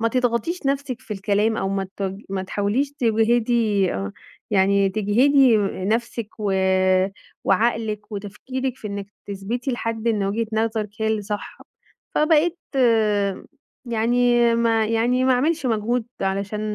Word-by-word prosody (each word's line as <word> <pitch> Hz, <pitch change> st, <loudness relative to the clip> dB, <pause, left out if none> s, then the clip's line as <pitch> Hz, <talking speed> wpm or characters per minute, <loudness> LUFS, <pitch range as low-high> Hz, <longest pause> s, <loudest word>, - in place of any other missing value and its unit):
ما 230 Hz, -, +2 dB
تضغطيش 250 Hz, +7 st, -1 dB
نَفْسِك 275 Hz, -3 st, -1 dB
في 230 Hz, -, -22 dB
الكلام 205 Hz, +3 st, +1 dB
أو 195 Hz, -, -1 dB
ما 195 Hz, -1 st, -2 dB
تج 195 Hz, +1 st, -4 dB
ما 190 Hz, -1 st, -2 dB
تحاوليش 210 Hz, +9 st, -1 dB
تجهِدي 225 Hz, -4 st, +2 dB
آه، 95 Hz, 0 st, -4 dB, 0.4 s
يعني 200 Hz, 0 st, +3 dB
تجهِدي 230 Hz, +5 st, +4 dB, 0.3 s
نَفْسِك 230 Hz, 0 st, -1 dB
و 205 Hz, -2 st, -1 dB, 0.9 s
وعقلِك 215 Hz, 0 st, 0 dB
وتفكيرِك 255 Hz, +6 st, -4 dB
في 220 Hz, -, -8 dB
إنِك 200 Hz, -1 st, -5 dB, 0.2 s
تثبْتي 215 Hz, +7 st, -3 dB
لحد 230 Hz, -1 st, -2 dB
إن 210 Hz, -3 st, +1 dB
وجهة 220 Hz, +3 st, -1 dB
نظرِك 220 Hz, -1 st, 0 dB
هي 220 Hz, -, +1 dB
اللي 220 Hz, -1 st, 0 dB
صح. 205 Hz, 0 st, -5 dB, 0.6 s
فبقيت 320 Hz, +3 st, +3 dB, 1.3 s
يعني 240 Hz, +1 st, +3 dB
ما 225 Hz, -1 st, +2 dB
يعني 240 Hz, +3 st, +1 dB
ما 260 Hz, -, +4 dB
أعملش 285 Hz, +3 st, +1 dB
مجهود 225 Hz, +1 st, 0 dB
علشان 200 Hz, +2 st, -2 dB
225 Hz, 130 wpm, -22 LUFS, 205-245 Hz, 1.3 s, تجهِدي